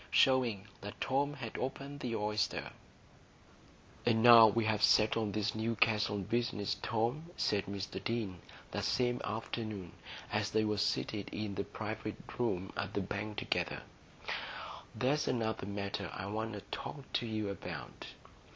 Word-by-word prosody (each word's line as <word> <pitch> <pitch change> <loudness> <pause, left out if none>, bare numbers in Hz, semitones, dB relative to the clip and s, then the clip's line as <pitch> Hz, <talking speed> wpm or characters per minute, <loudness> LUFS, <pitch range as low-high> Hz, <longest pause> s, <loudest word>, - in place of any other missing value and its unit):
Showing 125 -7 +4 0.2
That 100 +1 -7
Tom 140 +2 +1
Had 120 -6 -5
Opened 140 +2 -4
the 120 -4 -2
Oyster 105 -2 0 1.3
"And 110 -1 +3
now 115 -2 +11
we've 110 -1 +2
settled 105 -1 +4
this 105 0 0
Newcastle 110 -2 +2
business, 110 0 0
Tom," 120 +9 0
said 100 -2 +1
Mr 95 -1 -4
Deane, 105 -6 -2 0.3
that - - -2
same 125 -1 +1
afternoon, 110 -4 -4 0.4
as - - +1
they 110 0 +2
were 105 -1 +1
seated 105 0 0
in 105 -1 -3
the - - -1
private - - -4 0.2
room 95 -6 0
at - - -3
the 100 - +2
Bank 105 +2 -4
together, - - -1 1.1
"there's 140 +4 +2
another 110 -5 0
matter 100 -2 -3
I 95 - -5
want 110 +2 -2
to 105 - -5
talk 140 - -5
to 120 - +1
you 110 -2 -1
about. 85 -9 -6
110 Hz, 140 wpm, -34 LUFS, 100-120 Hz, 1.3 s, now